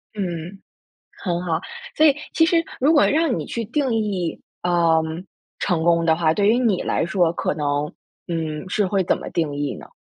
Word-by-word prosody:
嗯， 180 -1 -4 0.6
很 175 -1 -1
好， 165 -3 0 0.4
所 310 - +5
以 285 -2 +6 0.2
其 325 - +4
实 330 0 +2 0.2
如 290 +5 +4
果 295 - +5
让 310 -4 +2
你 - - -4
去 230 -2 -4
定 260 +1 0
义， 195 -6 -1 0.2
呃， 170 -2 +3 0.6
成 170 -4 0
功 170 -1 +3
的 160 -1 +4
话， 160 -1 +2
对 205 +2 +2
于 230 +3 +4
你 220 -7 +1
来 - - 0
说， 170 -1 +2
可 - - -1
能， 145 -1 -1 0.4
嗯， 160 0 -3
是 205 0 +1
会 190 0 +1
怎 - - +1
么 - - -7
定 155 -4 -1
义 145 -1 -2
呢？ - - -11
175 Hz, 205 characters per minute, -22 LUFS, 165-225 Hz, 0.6 s, 以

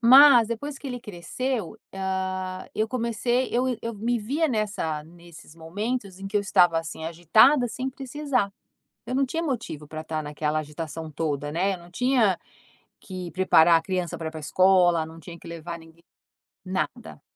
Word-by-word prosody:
Mas 245 -1 +8
depois 275 +5 -4
que 275 - -7
ele 250 -1 -4
cresceu, 210 +3 -4 0.2
ah, 185 -1 -3
eu 220 +1 0
comecei 240 +1 0
eu 245 - +2 0.2
eu 230 0 -4
me 235 +3 0
via 285 +10 0
nessa 200 - -2
nesses 170 -1 -15
momentos 195 +4 -4
em 195 - -6
que 205 +2 -1
eu - - +4
estava 175 -4 +4
assim 160 0 -7
agitada 215 - +4
sem 260 +3 -3
precisar, 265 -5 -2 0.5
eu 255 - -3
não 275 +1 +3
tinha 325 +6 -3
motivo 230 - -4
pra 155 +1 -6
tá 155 -1 -3
naquela 150 +1 -2
agitação 155 +1 -6
toda 145 -2 -2
né, 190 +5 +1
eu - - -11
não 170 0 -15
tinha 240 -3 +2 0.6
que 185 -2 -7
preparar 175 -2 +5
a - - -8
criança 180 -3 -2
pra 165 - -5
ir - - -9
pra 160 - -7
escola, 175 0 +4
não 165 +1 -12
tinha 170 0 -10
que - - -15
levar 170 0 -6
ninguém, 165 0 -17 0.6
nada. 150 - -4
185 Hz, 175 wpm, -25 LUFS, 165-235 Hz, 0.6 s, Mas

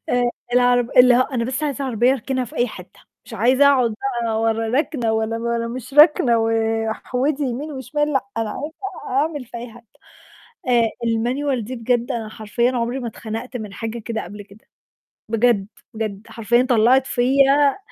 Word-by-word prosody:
آآ، 245 -1 +1 0.2
الع 245 0 +4
اللي 245 +1 +5
هو 255 - +4
أنا 255 -3 -3
بس 260 +5 -3
عايزة 285 -2 -2
عربية 245 0 +2
أركنها 260 0 -2
في 240 - -12
أي 240 - +2
حتّة، - - -12 0.2
مش - - -10
عايزة 260 +4 +3
أقعد 255 -5 +3 0.3
بقى 220 -1 -1
ولا 225 0 0
راكنة 245 -8 -1
ولا 220 0 -1
ولا 235 0 -2
مش 255 +3 -7
راكنة 295 -6 +6
واحودي 225 +5 -1
يمين 275 +4 -3
وشمال 295 +3 -2
لأ، 270 -5 +1
أنا 225 -1 -1
عايزة 300 +4 -6 0.5
أعمل 295 -3 -2
في 240 0 -10
أي 235 0 -8
حتة. 240 0 -16 0.8
آآ، 235 -2 +3 0.2
الManual 245 +4 0
دي 250 +5 -6
بجد 240 +2 0
أنا 225 -3 -4
حرفيًا 230 +3 -1
عمري 245 +1 -2
ما 245 - -4
اتخنقت 225 +3 -6
من 210 -4 -8
حاجة 225 +2 -5
كده 225 0 -4
قبل 205 +1 -9
كده، 205 +1 -18 0.6
بجد، 225 -3 +2 0.3
بجد 215 -1 -5
حرفيّا 230 +2 +1
طلّعت 250 +3 +4
فيّا 275 +4 +3
240 Hz, 170 wpm, -21 LUFS, 225-260 Hz, 0.8 s, راكنة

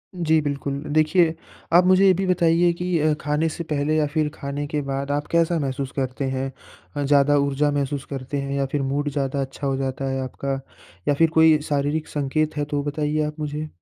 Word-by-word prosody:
जी, 160 -2 +2
बिल्कुल। 140 -1 -3
देखिए, 160 +2 +3 0.4
आप 175 +1 +7
मुझे 185 +1 +5
ये 190 - +7
भी 190 +2 -1
बताईए 175 -1 +3
कि 180 0 -1
अ, 155 0 +3
खाने 150 +3 0
से 170 +2 -5
पहले 150 -1 -1
या 155 - +3
फ़िर 150 +1 0
खाने 145 -1 -4
के 150 0 -2
बाद 140 0 -3
आप 145 +1 -1
कैसा 170 0 +2
महसूस 135 -1 -3
करते 135 0 -2
हैं? 135 0 -2 0.4
अ, 145 - -1
ज़्यादा 145 +1 +4
ऊर्जा 140 +1 +1
महसूस 140 -1 -2
करते 135 +1 -4
हैं 140 0 -4
या 140 - +1
फ़िर 140 +1 -2
मूड 145 +2 -1
ज़्यादा 140 0 -1
अच्छा 135 +1 -4
हो 135 - 0
जाता 135 0 -3
है 135 0 -2
आपका 135 +1 -3 0.5
या - - +4
फ़िर 165 +3 +3
कोई 160 -1 +6
शारीरिक 145 +2 0
संकेत 150 +2 -1
हैं, 145 - 0
तो 145 -1 -2
बताईए 150 +1 -1
आप 150 +1 -6
मुझे। 150 0 -3
145 Hz, 210 wpm, -23 LUFS, 140-155 Hz, 0.5 s, आप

